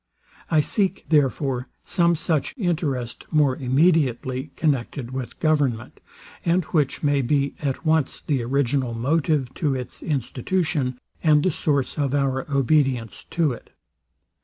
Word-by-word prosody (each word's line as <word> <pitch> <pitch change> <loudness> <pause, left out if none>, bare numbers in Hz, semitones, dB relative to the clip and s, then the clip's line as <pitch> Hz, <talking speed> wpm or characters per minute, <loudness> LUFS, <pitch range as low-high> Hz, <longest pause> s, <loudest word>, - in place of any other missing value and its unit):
I 160 -2 +4
seek, 195 +5 -1
therefore, 135 -4 +1 0.2
some 170 -1 +2
such 160 - -1
interest 150 - -2
more 145 -4 +3
immediately 130 -1 +1
connected 135 -4 -1
with 130 -2 -6
government, 145 -8 0 0.4
and 175 +2 +2
which 150 -4 0
may 145 -1 +3
be 140 +2 +1
at 140 +2 -3
once 155 -3 +1
the 140 -5 -1
original 130 -1 0
motive 140 +1 0
to 145 -4 0
its 125 -1 -6
institution, 145 0 -1 0.2
and 150 -2 +4
the 185 - +2
source 145 -1 -1
of 140 -1 +1
our 135 0 0
obedience 135 -4 +1
to 165 -4 +1
it. 120 - -9
140 Hz, 130 wpm, -23 LUFS, 130-155 Hz, 0.4 s, I